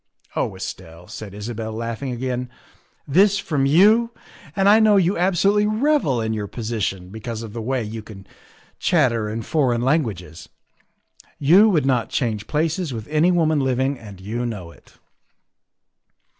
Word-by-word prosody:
' -, -, -59 dB
' -, -, -36 dB
" -, -, -28 dB
Oh -, -, -1 dB
Estelle," 90 Hz, -2 st, -8 dB
said 105 Hz, -2 st, -9 dB
Isabel, 110 Hz, +1 st, -5 dB
laughing 115 Hz, +3 st, -4 dB
again, 125 Hz, 0 st, -3 dB, 0.3 s
" -, -, -35 dB, 0.3 s
this 195 Hz, +7 st, +4 dB
from 150 Hz, -8 st, 0 dB
you, 210 Hz, +10 st, +5 dB, 0.5 s
and 195 Hz, 0 st, +2 dB
I 210 Hz, +2 st, +7 dB
know 215 Hz, -2 st, +5 dB
you 185 Hz, +1 st, +2 dB
absolutely 195 Hz, +4 st, +2 dB
revel 220 Hz, -, +1 dB
in 110 Hz, 0 st, -2 dB
your 105 Hz, -2 st, -3 dB
posi 115 Hz, 0 st, -5 dB
tion 90 Hz, -1 st, -3 dB
because 110 Hz, +2 st, -6 dB
of 110 Hz, -2 st, -9 dB
the 115 Hz, -, -5 dB
way 130 Hz, +1 st, -1 dB
you 110 Hz, +1 st, -6 dB
can 100 Hz, -3 st, -12 dB, 0.5 s
chatter 120 Hz, -, +1 dB
in 110 Hz, +1 st, -4 dB
foreign 125 Hz, -4 st, +1 dB
lan 140 Hz, +6 st, +3 dB
guages. 90 Hz, -, -8 dB, 0.9 s
You 180 Hz, +10 st, +5 dB
would 155 Hz, -8 st, +2 dB
not 125 Hz, -3 st, +1 dB
change 110 Hz, -5 st, -2 dB
places 160 Hz, +1 st, -1 dB
with 115 Hz, -3 st, -6 dB
any 155 Hz, +4 st, +3 dB
woman 160 Hz, -3 st, +2 dB
living, 130 Hz, 0 st, 0 dB
and 100 Hz, -4 st, -12 dB
you 110 Hz, +6 st, -4 dB
know 100 Hz, -8 st, -5 dB
it." -, -, -21 dB
125 Hz, 170 wpm, -21 LUFS, 110-165 Hz, 0.9 s, I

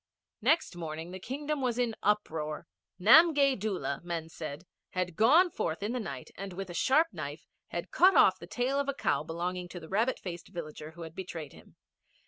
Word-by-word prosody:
Next 300 Hz, -, +2 dB
morning 165 Hz, 0 st, -6 dB
the 185 Hz, -, -7 dB
Kingdom 285 Hz, +7 st, -3 dB
was 245 Hz, -2 st, 0 dB
in 240 Hz, -3 st, 0 dB
uproar. 160 Hz, -8 st, -1 dB, 0.3 s
Namgay 280 Hz, -, +7 dB
Doola, 190 Hz, -9 st, -2 dB
men 170 Hz, -2 st, -4 dB
said, 155 Hz, +1 st, -7 dB, 0.3 s
had 180 Hz, -2 st, -2 dB
gone 315 Hz, -, +5 dB
forth 160 Hz, -, -2 dB
in 210 Hz, -, -1 dB
the 250 Hz, -, -2 dB
night 140 Hz, -, -6 dB
and 195 Hz, -1 st, -6 dB
with 190 Hz, 0 st, -6 dB
a -, -, -7 dB
sharp 305 Hz, -, +3 dB
knife -, -, -6 dB, 0.2 s
had -, -, -5 dB
cut 385 Hz, -6 st, +6 dB
off -, -, +6 dB
the -, -, -10 dB
tail 260 Hz, +3 st, 0 dB
of 280 Hz, 0 st, -1 dB
a 280 Hz, -, -1 dB
cow -, -, +1 dB
belonging 175 Hz, +2 st, -4 dB
to 175 Hz, -, -7 dB
the 160 Hz, -1 st, -12 dB
rabbit 225 Hz, +6 st, +1 dB
faced 175 Hz, -2 st, -7 dB
villager 155 Hz, -3 st, -7 dB
who 170 Hz, +1 st, -9 dB
had 160 Hz, -1 st, -8 dB
betrayed 165 Hz, -6 st, -7 dB
him. -, -, -17 dB
190 Hz, 195 wpm, -30 LUFS, 165-260 Hz, 0.3 s, Namgay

